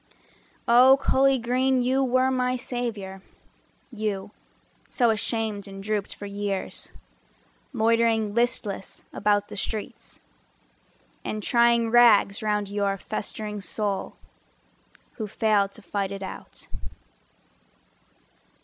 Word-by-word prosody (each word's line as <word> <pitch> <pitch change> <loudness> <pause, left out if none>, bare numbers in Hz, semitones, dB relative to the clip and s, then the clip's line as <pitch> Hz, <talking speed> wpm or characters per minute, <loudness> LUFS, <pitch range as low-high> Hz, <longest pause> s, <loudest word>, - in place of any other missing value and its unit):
Oh, 255 +3 +7
Cully 270 0 +3
Green, 255 +2 +1
you 260 +2 +2
were 255 +1 +2
my 255 -1 +1
savior— 230 -7 -4 0.7
You, 210 -2 -3 0.6
so 240 -3 +3
ashamed 220 -2 -2
and 195 0 -9
drooped 210 -1 -2
for 205 - -8
years, 200 -1 -4 0.8
Loitering 225 -1 +2
listless 220 -4 -2
about 205 0 +1
the - - -9
streets, 210 +1 -5 1.0
And 215 -1 -4
tying 235 -1 +3
rags 225 -3 +5
round 210 -1 0
your 200 -1 -1
festering 210 +1 -5
soul, 200 +1 -3 1.0
Who 215 - -3
failed 205 -1 +1
to 220 - -9
fight 195 +1 -2
it 195 0 -6
out. 190 - -9
215 Hz, 105 wpm, -25 LUFS, 200-240 Hz, 1.0 s, Oh